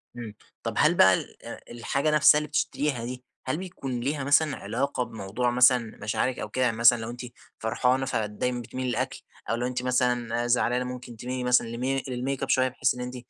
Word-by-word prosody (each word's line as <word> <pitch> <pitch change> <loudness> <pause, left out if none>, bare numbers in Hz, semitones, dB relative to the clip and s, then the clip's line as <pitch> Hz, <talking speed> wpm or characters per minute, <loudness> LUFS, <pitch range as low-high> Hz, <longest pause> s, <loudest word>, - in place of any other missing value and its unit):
امم 115 -3 -7 0.3
طب، - - -2
هل - - +4
بقى - - +7
ال - - 0 0.5
الحاجة 140 +5 -1
نفسها 150 0 +6
اللي 150 - -5
بتشتريها 145 -4 -1
دي، 125 +1 -6 0.2
هل 130 +3 -1
بيكون 140 -9 -5
ليها 140 +3 -2
مثلًا 145 +1 +3
علاقة 140 -2 -2
بموضوع 115 +3 -2
مثلًا 125 -2 +4
مشاعرِك 110 +4 -1
أو 105 - -5
كده، 125 +1 +1
مثلًا 120 +2 +5
لو 115 - -5
أنتِ 120 +1 -7 0.4
فرحانة 125 +4 +1
فدايمًا 120 +2 -2
بتميلي 130 +2 -4
للأكل، 120 - -2 0.3
أو 115 - +1
لو 120 +1 -1
أنتِ 125 0 -3
مثلًا 120 -2 0
زعلانة 125 +1 +2
مُمكن 125 -2 -8
تميلي 125 +2 -4
مثلًا 125 -2 +3
لمي 130 +3 -2
للميك 130 +2 -3
أب - - -3
شوية، 130 0 +3
بحيث 130 0 0
إن 125 - -6
أنتِ 125 +1 -5
125 Hz, 190 wpm, -26 LUFS, 120-130 Hz, 0.5 s, بقى